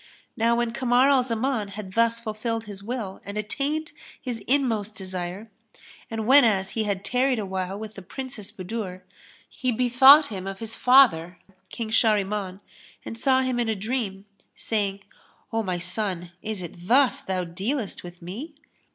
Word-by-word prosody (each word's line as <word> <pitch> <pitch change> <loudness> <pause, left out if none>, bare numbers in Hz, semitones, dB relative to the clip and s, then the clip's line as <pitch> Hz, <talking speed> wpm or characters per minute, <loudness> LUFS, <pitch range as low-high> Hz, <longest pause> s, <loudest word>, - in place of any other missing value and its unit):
Now 230 +1 +2
when 240 -1 0
Kamar 255 +2 +3
al 270 -2 +5
Zaman 240 -2 -1
had 195 -2 -7
thus 230 +1 +2
fulfilled 225 0 -3
his 205 -2 -9
will 210 -3 -5
and 200 +1 -6
attained 285 +9 -2 0.3
his 245 -3 -4
inmost 225 -6 +1
desire, 185 +2 -5 0.6
and 225 -1 -3
whenas 225 -7 +5
he 220 -1 -1
had 200 -1 -2
tarried 255 +1 +2
awhile 190 -2 -3
with 215 0 -7
the 195 - -9
Princess 235 +1 -7
Budur, 185 -2 -6 0.4
he 255 -1 -2
bethought 260 +5 +7
him 195 -3 -6
of 195 0 -5
his 225 +1 -6
father, 225 -10 +5 0.3
King 225 -2 -5
Shahriman, 205 -3 +1 0.4
and - - -6
saw 260 +2 +3
him 255 -1 -1
in 235 -2 0
a 220 - +1
dream, 205 -2 -3 0.3
saying, 200 -3 -2 0.5
"O 225 - +1
my 185 -4 -2
son, 180 -1 -2
is 210 -4 -4
it 175 +1 -10
thus 270 +3 +4
thou 190 -8 -2
dealest 195 +7 -3
with 175 0 -11
me?" 245 - -7
220 Hz, 160 wpm, -25 LUFS, 195-250 Hz, 0.6 s, bethought